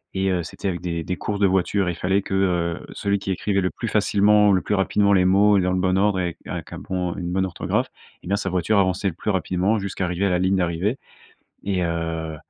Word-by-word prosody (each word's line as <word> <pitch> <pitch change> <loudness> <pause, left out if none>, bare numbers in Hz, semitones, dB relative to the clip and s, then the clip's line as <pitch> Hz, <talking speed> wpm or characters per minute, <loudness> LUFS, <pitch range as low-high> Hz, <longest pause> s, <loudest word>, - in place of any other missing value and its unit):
Et 95 0 +1
heu, 90 -1 0
c'était 95 - -4
avec 85 -2 -4
des 85 -2 -3
des 90 - -3
courses 105 -1 -3
de 100 - +4
voitures. 95 +1 +1
Et - - +1
il - - -6
fallait 95 +3 0
que 90 -3 0
celui 100 0 -1
qui 100 - -6
écrivait 100 +1 0
le 90 - 0
plus 115 - -6
facilement, 105 0 +4
le 95 - +2
plus 105 - -2
rapidement 100 +1 +2
les 90 -2 +4
mots 100 +2 +5
et - - +2
dans 90 - 0
le 90 - 0
bon 95 0 +1
ordre 100 -2 +2
et 90 - 0
avec 85 -2 -4
et - - -10
avec - - -6
un - - -6
bon 90 -2 -3
une 90 -3 -4
bonne 95 +1 +1
orthographe. 90 -2 -2 0.3
Et - - -10
ben 100 +2 +1
sa 95 - -2
voiture 95 +3 +1
avançait 95 +1 +1
le - - -7
plus 90 - -5
rapidement 95 +2 +1
jusqu'à 100 -2 -3
arriver 90 +2 -1
à - - +2
la 90 - +1
ligne 95 +1 +2
d'arrivée. 90 +7 0 0.7
Et 95 -3 -1
heu 80 -1 -3
95 Hz, 260 wpm, -23 LUFS, 90-100 Hz, 0.7 s, mots